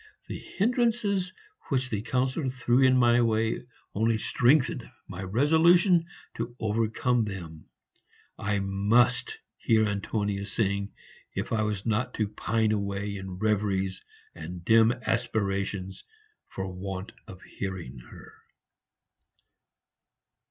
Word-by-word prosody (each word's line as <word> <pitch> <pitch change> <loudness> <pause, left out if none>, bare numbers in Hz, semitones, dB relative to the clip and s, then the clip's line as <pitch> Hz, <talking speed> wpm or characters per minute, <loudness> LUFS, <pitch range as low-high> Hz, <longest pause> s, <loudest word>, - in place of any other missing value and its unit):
The - - -5
hindrances 215 -4 0 0.4
which 130 -3 0
the 105 -2 -1
Councillor 130 +4 -1
threw 125 0 +1
in 130 -1 +5
my 120 -1 +5
way 110 -1 +1 0.3
only 110 +2 +2
strengthened 130 +4 +2 0.2
my 95 -1 -7
resolution 165 - +4 0.3
to 115 +1 -4
overcome 115 +2 +1
them; 85 -6 -7 0.7
I 100 0 -1
MUST 110 - +2 0.2
hear 110 -2 +3
Antonia 100 -1 -2
sing 100 -2 -1 0.4
if - - -3
I 110 - +2
was 105 -2 -2
not 115 +3 0
to 110 - 0
pine 110 +1 0
away 100 -1 -2
in 95 -1 -6
reveries 95 -2 0 0.3
and 85 +2 -8
dim 115 +1 +6
aspirations 100 -4 -1 0.4
for 95 -1 -5
want 95 +2 -5 0.2
of 95 - -10
hearing 90 -10 -6
her. - - -14
110 Hz, 110 wpm, -28 LUFS, 100-125 Hz, 0.7 s, dim